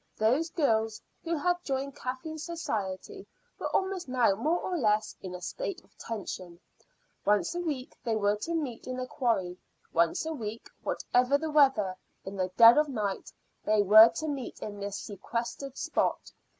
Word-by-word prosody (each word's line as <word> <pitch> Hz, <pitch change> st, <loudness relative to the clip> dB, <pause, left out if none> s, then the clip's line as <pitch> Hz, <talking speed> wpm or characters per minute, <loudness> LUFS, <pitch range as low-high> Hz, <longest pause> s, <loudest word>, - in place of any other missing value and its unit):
Those 260 Hz, +10 st, +2 dB
girls 225 Hz, -9 st, +1 dB, 0.2 s
who 335 Hz, 0 st, -1 dB
had 355 Hz, +3 st, 0 dB
joined 275 Hz, 0 st, -3 dB
Kathleen's 260 Hz, +5 st, -5 dB
society 330 Hz, -, -4 dB, 0.3 s
were -, -, -2 dB
almost 380 Hz, -3 st, -1 dB
now 245 Hz, -5 st, +3 dB
more 300 Hz, -, +1 dB
or 365 Hz, -, -3 dB
less 215 Hz, -8 st, +1 dB
in 185 Hz, -2 st, -6 dB
a 180 Hz, -, -8 dB
state 400 Hz, -, -4 dB
of -, -, -29 dB
tension. 185 Hz, -5 st, -6 dB, 0.6 s
Once 210 Hz, +8 st, +2 dB
a 350 Hz, -, -3 dB
week 285 Hz, -7 st, -4 dB
they 230 Hz, -3 st, 0 dB
were 205 Hz, -1 st, +2 dB
to 335 Hz, +11 st, -3 dB
meet 270 Hz, -9 st, -4 dB
in 255 Hz, 0 st, -4 dB
the 255 Hz, -, -2 dB
quarry; 190 Hz, -9 st, -1 dB, 0.3 s
once 170 Hz, -, +2 dB
a 320 Hz, -, -2 dB
week, 225 Hz, -4 st, -6 dB
whatever 250 Hz, +3 st, +2 dB
the 315 Hz, +1 st, -4 dB
weather, 265 Hz, -11 st, +4 dB, 0.3 s
in 190 Hz, +1 st, -6 dB
the 185 Hz, -1 st, -1 dB
dead 230 Hz, +4 st, +9 dB
of 300 Hz, -1 st, +2 dB
night, 210 Hz, -7 st, -3 dB, 0.3 s
they 215 Hz, -1 st, +3 dB
were 215 Hz, +3 st, +9 dB
to 315 Hz, -, -3 dB
meet 275 Hz, -4 st, -4 dB
in 205 Hz, -1 st, -6 dB
this 200 Hz, 0 st, -4 dB
sequestered 235 Hz, +6 st, -5 dB
spot. -, -, -1 dB
245 Hz, 170 wpm, -29 LUFS, 210-305 Hz, 0.6 s, dead